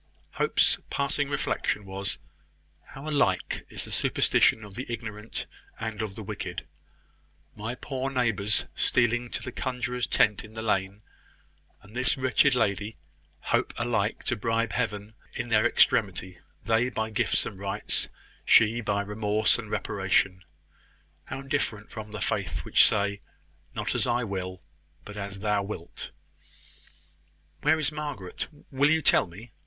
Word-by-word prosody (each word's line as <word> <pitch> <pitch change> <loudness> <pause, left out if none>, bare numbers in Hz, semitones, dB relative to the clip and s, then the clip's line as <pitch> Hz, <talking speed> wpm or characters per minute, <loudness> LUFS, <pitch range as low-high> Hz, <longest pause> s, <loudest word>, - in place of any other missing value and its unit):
Hope's - - +3
passing 140 0 0
reflection 135 -6 -1
was, 95 0 -3 0.7
"How 135 +3 -10
alike 150 -2 +1
is - - -2
the - - -10
superstition 110 - +3
of 105 -2 -10
the 125 +6 -4
ignorant 110 -1 -5 0.3
and 110 -1 -3
of 105 -3 -3
the 110 - -6
wicked! - - -5 0.9
My 110 +3 -4
poor 135 0 -3
neighbours 115 -6 +2
stealing 120 0 +2
to - - -3
the 125 - -5
conjuror's 125 -1 -2
tent 105 -2 +3
in 110 0 -13
the 110 - -4
lane, 100 -1 0 0.8
and 105 +3 -15
this 130 +4 +4
wretched 130 +1 +4
lady, 105 -3 0 0.4
hope - - 0
alike 115 -3 0
to 120 - 0
bribe 115 +1 0
Heaven 110 -3 -2 0.2
in 120 - -3
their 110 +1 +5
extremity 95 -6 +2 0.3
they 115 +3 +3
by 110 -2 -2
gifts 110 - +2
and 95 - -7
rites, 100 +1 -1 0.3
she 115 +2 +5
by 100 -3 0
remorse 105 +1 +1
and - - -7
reparation. 95 -1 +1 0.8
How 135 - -6
different 135 -7 -2
from 110 -1 -7
the 105 -2 -6
faith - - -1
which - - +6
say; 100 -1 0 0.5
`Not - - -1
as - - +1
I 120 0 +1
will, 95 -4 -4 0.4
but 105 - -9
as 100 -1 -5
thou 105 -1 +2
wilt!'" 100 -4 -7 1.5
"Where 160 - +4
is 155 -1 0
Margaret? 145 -11 -4 0.2
Will 140 +2 +4
you 160 0 +3
tell - - +5
me?" 105 +7 -12
110 Hz, 145 wpm, -28 LUFS, 100-125 Hz, 1.5 s, which